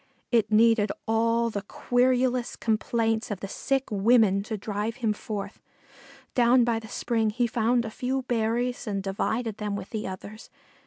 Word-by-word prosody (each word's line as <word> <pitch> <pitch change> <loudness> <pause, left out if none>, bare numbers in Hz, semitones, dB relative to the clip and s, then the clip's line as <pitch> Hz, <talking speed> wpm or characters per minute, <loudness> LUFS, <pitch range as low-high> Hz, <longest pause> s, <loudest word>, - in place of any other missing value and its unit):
It 230 -3 +2
needed 220 -1 +4 0.2
all 230 +1 +2
the 200 - -3
querulous 245 +3 +1
complaints 225 0 0
of 205 -4 -4
the 195 - -5
sick 270 +6 -1
women 205 -1 +4
to 220 +1 -4
drive 210 +2 -3
him 230 -5 0
forth. 210 -1 -6 0.7
Down 245 0 +5
by 235 -1 +1
the 220 - -11
spring 225 0 0
he 240 +3 0
found 235 +1 +1
a 220 - -5
few 260 +3 -2
berries 240 +1 -1
and 200 -2 -2
divided 220 +3 -2
them 210 -1 -3
with 195 -1 -7
the 215 -1 -3
others. 200 +4 -9
225 Hz, 160 wpm, -26 LUFS, 210-240 Hz, 0.7 s, Down